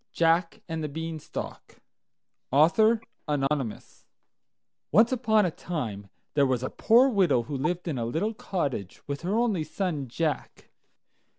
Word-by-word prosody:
JACK 165 +5 +2
AND 160 -2 -3
THE 150 - -2
BEANSTALK 160 +1 -6 1.5
Anonymous 135 -5 -2 0.8
Once 225 +4 +5
upon 220 -5 +3
a 175 - 0
time 110 - -5 0.2
there 140 -2 +4
was 130 -1 0
a 130 - -3
poor 240 +4 +5
widow 185 - +3
who 140 +5 -5
lived 175 +7 -2
in 145 -7 -2
a 115 - -1
little 165 - -1
cottage 140 - -3
with 140 -1 -4
her 190 +6 0
only 220 -9 +1
son 155 -6 -3
Jack. 155 +5 -3
160 Hz, 130 wpm, -27 LUFS, 135-190 Hz, 1.5 s, Once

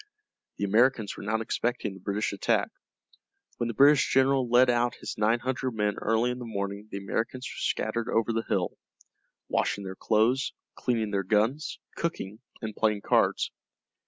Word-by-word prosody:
The - - -3
Americans 110 +1 +3
were - - -8
not 110 +2 -1
expecting 115 -2 -2
the 95 - -11
British 100 +3 -2
attack. 100 - +1 0.9
When 120 - -1
the 115 - -4
British 140 +3 +5
general 135 -1 +3
led 125 +2 +6
out 120 0 +2
his - - -6
nine 110 +2 +3
hundred 130 0 -2
men 105 -1 0
early 115 +3 +1
in 125 - -5
the 120 - -6
morning 100 -1 -4
the 100 - -5
Americans 115 +6 -3
were - - -7
scattered 115 +1 -1
over 115 +1 +1
the 115 - +1
hill, - - -1 0.7
washing 100 - 0
their 95 -1 -5
clothes, 115 +6 +2 0.2
cleaning 115 -4 -1
their 100 -1 +1
guns, 110 - 0 0.2
cooking, 110 - -3 0.2
and 110 -1 -4
playing 105 -2 +1
cards. - - +2
115 Hz, 165 wpm, -28 LUFS, 105-125 Hz, 0.9 s, led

